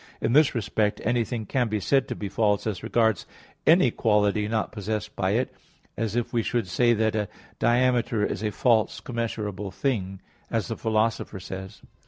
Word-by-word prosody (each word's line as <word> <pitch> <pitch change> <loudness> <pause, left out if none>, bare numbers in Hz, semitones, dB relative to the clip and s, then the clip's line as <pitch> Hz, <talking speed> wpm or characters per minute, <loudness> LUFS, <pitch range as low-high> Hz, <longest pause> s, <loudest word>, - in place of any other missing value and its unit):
In 115 - 0
this 150 -1 +5
respect 105 -1 0
anything 120 -1 0
can 125 +3 0
be 110 -1 -1
said 135 +6 +2
to - - -4
be 105 - -4
false 105 0 +1
as 105 -5 -2
regards 110 -1 +1 0.4
any 160 -6 +6
quality 105 -1 +2
not 110 -1 -1
possessed 105 0 -4
by 95 +1 0
it; 125 +3 0 0.4
as 110 -1 -2
if 120 0 -1
we 115 - +2
should 115 -2 -1
say 120 +7 +3
that 110 0 +1
a 105 -1 0 0.3
diameter 120 -3 +2
is - - -3
a 110 - 0
false 110 +1 +2
commensurable 105 -4 -4
thing, 95 -6 -2 0.3
as 115 0 -1
the 115 - -2
Philosopher 110 -2 0
says 95 +2 -8
(Metaph. - - -19
110 Hz, 180 wpm, -26 LUFS, 105-120 Hz, 0.4 s, any